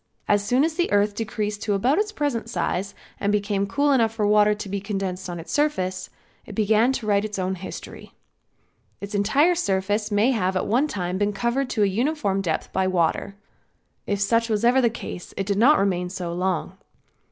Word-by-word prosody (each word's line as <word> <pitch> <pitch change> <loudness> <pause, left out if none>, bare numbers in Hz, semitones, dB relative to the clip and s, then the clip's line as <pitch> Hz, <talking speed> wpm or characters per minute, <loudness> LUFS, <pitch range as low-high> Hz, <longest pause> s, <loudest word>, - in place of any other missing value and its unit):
As 205 -1 +3
soon 250 +6 +2
as 320 0 +1
the 345 +2 -1
earth 205 0 +3
decreased 210 -1 -3
to 205 -2 0
about 255 - +2
its 420 0 0
present 290 - -2
size 185 +2 -2 0.2
and 200 - 0
became 200 -1 0
cool 285 +8 +1
enough 230 -5 +3
for 220 -2 -1
water 210 0 +4
to 210 - -7
be 200 +1 -3
condensed 190 -2 -4
on 175 -1 -5
its 165 - -9
surface, 185 -12 -1 0.3
it - - -10
began 220 +3 +3
to 235 - -4
write 205 -1 +2
its 210 -1 -4
own 185 0 -1
history. 185 0 -9 0.9
Its 200 +1 -7
entire 245 - +3
surface 205 - 0
may 210 +5 +3
have 190 -6 0
at - - -1
one 255 +8 +2
time 185 -6 -3
been 205 0 +1
covered 240 +6 -1
to 220 -4 +1
a - - +5
uniform 205 -1 0
depth 165 -5 -3
by 190 0 +1
water. 185 +2 0 0.7
If 200 -1 -1
such 230 +3 +1
was 215 +1 +1
ever 250 +2 +5
the 235 - +3
case 220 -5 -8
it 195 - -1
did 200 0 0
not 285 +7 +6
remain 180 -2 0
so 180 -2 -5
long. 180 -1 -2
205 Hz, 200 wpm, -24 LUFS, 190-235 Hz, 0.9 s, not